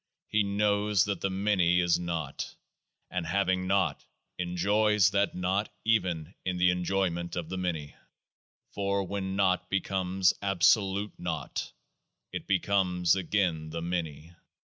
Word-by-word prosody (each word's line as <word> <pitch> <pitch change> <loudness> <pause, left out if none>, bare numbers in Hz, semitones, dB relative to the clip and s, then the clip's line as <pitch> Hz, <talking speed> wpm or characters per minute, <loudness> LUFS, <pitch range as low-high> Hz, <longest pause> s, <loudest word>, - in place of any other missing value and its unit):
he 110 - +2
knows 100 0 +2
that 100 -3 -3
the 95 - 0
Many 95 -3 +2
is 85 -1 +2
Naught; 85 -5 -4 0.6
and 90 -1 -2
having 95 +2 0
Naught, 100 +1 +1 0.4
en 90 0 -3
joys 105 +2 +3
that 100 0 +1
Naught 95 +4 0 0.2
even 90 -7 0
in 90 -1 -2
the 90 0 +4
enjoyment 90 -1 -1
of 85 -2 -4
the 95 - -4
Many. 80 -5 -3 0.8
For 100 0 0
when 95 0 -3
Naught 90 -2 +1
becomes 95 -1 +1
Absolute 100 +1 +2
Naught, 80 -5 -4 0.6
it - - -6
becomes 90 -3 +2
again 90 -4 0
the 85 +1 -5
Many. 85 -2 -4
95 Hz, 130 wpm, -29 LUFS, 85-100 Hz, 0.8 s, the